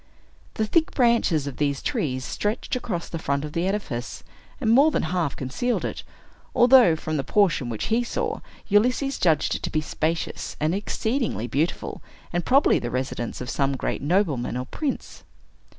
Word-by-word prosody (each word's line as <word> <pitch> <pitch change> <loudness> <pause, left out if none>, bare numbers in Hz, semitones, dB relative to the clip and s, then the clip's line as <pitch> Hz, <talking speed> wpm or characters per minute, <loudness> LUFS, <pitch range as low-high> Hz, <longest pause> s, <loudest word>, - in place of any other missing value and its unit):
The 220 - +1
thick 320 +8 +1
branches 235 - +3
of 140 - -6
these 140 -2 0
trees 130 -3 -2
stretched 210 +4 -2
across 200 -9 -3
the 165 - -5
front 140 -1 -1
of 150 - -8
the 170 +2 0
edifice, 145 - -3 0.4
and 225 -6 +2
more 275 +6 +6
than - - 0
half 175 -6 -1
concealed 140 - -2
it, - - -4 0.5
although, 245 -8 +7
from 155 0 -3
the 135 - -1
portion 170 -11 +2
which 110 -3 -3
he 240 +2 +3
saw, 235 - -2 0.3
Ulysses 250 +6 +2
judged 160 -5 +2
it - - -3
to - - -3
be 155 - 0
spacious 155 +2 -3
and 155 +2 +1
exceedingly 220 - -1
beautiful, 145 +7 -2 0.3
and 175 0 0
probably 270 - +4
the 120 - -4
residence 125 -2 -3
of 125 - -5
some 140 -1 0
great - - -2
nobleman 145 - +1
or 125 - -3
prince. 295 - -4
170 Hz, 170 wpm, -24 LUFS, 140-230 Hz, 0.5 s, although